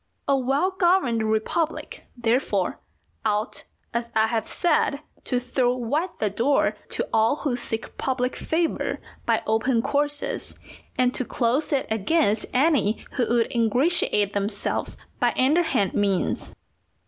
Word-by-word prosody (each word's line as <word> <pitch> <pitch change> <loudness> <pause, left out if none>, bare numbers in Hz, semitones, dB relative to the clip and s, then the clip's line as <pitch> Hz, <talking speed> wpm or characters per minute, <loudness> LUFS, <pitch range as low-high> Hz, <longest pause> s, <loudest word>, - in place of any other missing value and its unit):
A 275 - +4
well 275 +8 +1
governed 345 - +2
republic, 220 +9 -1
therefore, 240 +3 0 0.4
ought, 215 +2 -1 0.3
as 235 0 -2
I 220 0 +5
have 225 0 -1
said, 305 -4 +1 0.2
to 250 - 0
throw 250 0 +1
wide 285 +9 -1
the 210 -2 0
door 260 +7 +2
to - - -2
all 225 +3 +4
who 285 -4 -1
seek 225 -2 -5
public 255 -1 -1
favour 325 0 -1 0.3
by - - +2
open 230 +2 +1
courses, 290 0 -2 0.4
and 250 0 +3
to - - -2
close 250 +5 0
it 280 -2 +1
against 220 - +1
any 260 -6 +2
who 245 -4 0
would 235 -1 +1
ingratiate 230 - +2
themselves 200 0 -2 0.2
by - - +2
underhand 275 - +2
means. 200 -3 0
250 Hz, 130 wpm, -25 LUFS, 220-290 Hz, 0.4 s, I